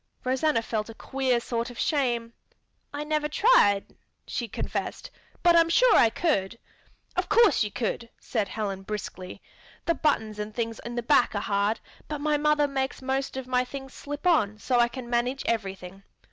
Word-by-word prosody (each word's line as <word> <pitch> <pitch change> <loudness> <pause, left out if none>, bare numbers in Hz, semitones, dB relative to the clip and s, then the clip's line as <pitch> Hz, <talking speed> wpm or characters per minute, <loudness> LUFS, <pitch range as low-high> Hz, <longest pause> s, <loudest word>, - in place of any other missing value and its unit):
Rosanna 260 -1 +1
felt 220 -1 -3
a 225 - -9
queer 265 -2 0
sort 235 0 -3
of 245 - -11
shame. 240 -6 0 0.6
"I 290 +1 -4
never 300 0 -1
tried," 295 - +3 0.3
she 240 - -3
confessed, - - -4 0.3
"but 345 -1 +6
I - - +8
am 330 - 0
sure 470 +7 +5
I 230 - +6
could." 230 - 0 0.6
"Of - - -1
course 455 - +5
you 210 - -2
could," 230 +2 -3
said 215 -5 -2
Helen 195 -1 -4
briskly. 190 -2 -7 0.4
"The 335 - +3
buttons 220 -10 0
and 210 0 -5
things 230 -1 -3
in 240 0 -6
the 240 - -2
back 240 -1 +3
are - - +1
hard, 200 +2 0 0.3
but 300 -1 -4
my 300 +1 +1
mother 300 0 +3
makes 270 -1 -3
most 265 0 -2
of 265 - -4
my 250 0 +1
things 270 +1 -8
slip 290 +3 -7
on 215 - +3
so 245 +3 +1
I 240 - +5
can 240 0 -8
manage 245 +3 0
everything. 195 -4 -3
245 Hz, 180 wpm, -27 LUFS, 215-290 Hz, 0.6 s, I